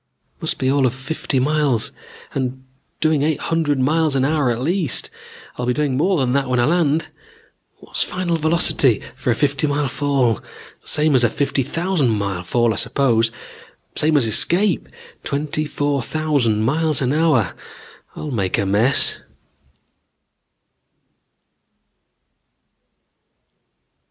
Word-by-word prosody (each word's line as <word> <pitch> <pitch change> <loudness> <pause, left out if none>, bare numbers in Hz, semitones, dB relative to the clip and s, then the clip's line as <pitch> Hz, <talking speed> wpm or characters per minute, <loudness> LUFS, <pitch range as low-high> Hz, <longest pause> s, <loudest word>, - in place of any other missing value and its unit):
Must - - -2
be 130 0 0
all 140 -2 +2
of 125 - -4
fifty 135 0 -3
miles, 140 -4 0 0.4
and 130 0 -3 0.4
doing 155 -2 +2
eight 155 +1 0
hundred 160 -4 -1
miles 155 +2 +1
an 135 -1 +1
hour 145 -3 +1
at 120 -1 -1
least. 165 +2 0 0.5
I'll 125 - -3
be 125 - +1
doing 145 -2 -1
more 180 +7 +1
than 130 -3 0
that 140 -1 0
when 125 -1 +1
I 120 - +3
land. 160 0 +1 0.7
What's - - -3
final 180 -2 -1
velocity 155 - +3
for 130 0 -4
a 120 - +2
fifty 145 +2 0
mile 145 0 -1
fall? 130 -4 0 0.4
Same 150 0 +1
as 125 -2 +4
a 120 - +4
fifty 140 +3 -1
thousand 165 0 -1
mile 100 -4 -2
fall, 120 +5 +1
I - - -6
suppose; 115 -5 +1 0.7
same 155 0 +2
as 130 - +3
escape; 175 - +2 0.3
twenty 150 +2 -2
four 145 -1 -1
thousand 130 -6 0
miles 155 +4 +2
an 130 +2 0
hour. 150 - +2 0.6
I'll 150 - -6
make 100 -7 -1
a 100 - 0
mess 105 +7 +3
140 Hz, 135 wpm, -19 LUFS, 125-155 Hz, 0.7 s, as